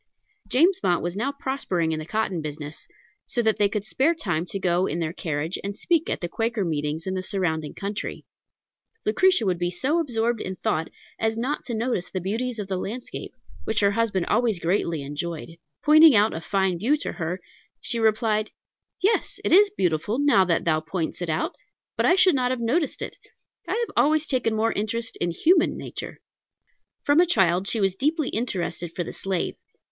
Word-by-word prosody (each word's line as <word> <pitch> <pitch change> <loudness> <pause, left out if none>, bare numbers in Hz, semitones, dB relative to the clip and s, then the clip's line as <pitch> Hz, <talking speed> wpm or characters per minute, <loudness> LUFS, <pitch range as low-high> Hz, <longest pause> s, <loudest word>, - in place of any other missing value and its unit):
James 350 +8 +3
Mott 175 -1 +1
was 175 +1 -2
now 245 +7 -1
prospering 265 - -1
in 155 - -2
the 155 - -7
cotton 205 -5 -1
business, 150 0 -7 0.4
so 240 - 0
that 220 -1 +2
they 205 -1 +3
could 205 0 -3
spare 285 +9 +2
time 175 - -2
to 195 - -2
go 180 -1 +1
in 160 - -2
their 165 -1 -2
carriage 160 0 -3
and 200 +1 -4
speak 335 -2 +1
at - - -2
the 175 - -2
Quaker 225 +1 -1
meetings 155 0 -2
in 190 - -2
the 185 - -2
surrounding 160 -6 -2
country. 200 +1 -5 0.8
Lucretia 365 - +3
would 180 -3 0
be 175 0 0
so 265 - 0
absorbed 235 -6 0
in 185 - -4
thought 160 -2 -1 0.3
as 225 0 0
not 260 +6 -2
to 235 - -3
notice 225 -5 -1
the 185 - -3
beauties 230 +7 -2
of 210 - -3
the 190 -1 -2
landscape, 230 +7 -6 0.3
which 220 -1 +1
her 200 0 +4
husband 200 -5 0
always 225 -4 +1
greatly 170 -3 0
enjoyed. 155 +4 -5 0.3
Pointing 310 -2 +8
out 210 +1 +4
a 160 - -4
fine 190 -1 0
view 265 - +2
to - - -4
her, 175 +1 -3 0.4
she 235 - -2
replied, 215 -1 +2 0.5
"Yes, 425 +4 +1
it - - 0
is 400 +4 +7
beautiful, 185 - 0
now 285 -9 +5
that 170 -2 +1
thou 155 -2 +3
points 160 +2 -4
it 175 - -3
out, 160 - -1 0.4
but - - +2
I 360 - +6
should 375 -1 +5
not 255 -2 +1
have 255 -1 -1
noticed 270 +7 0
it. - - -7 0.5
I - - -1
have 470 0 -2
always 310 +1 +3
taken 250 -6 +1
more 225 +1 +2
interest 225 +3 -2
in 175 - 0
human 330 - +3
nature." - - -7 0.8
From 290 +2 +4
a 355 - +5
child 190 - +2
she 225 - +1
was 195 -2 +2
deeply 300 - 0
interested 175 -6 -3
for 175 - -1
the - - -7
slave. 190 -3 -2
205 Hz, 195 wpm, -25 LUFS, 175-250 Hz, 0.8 s, Pointing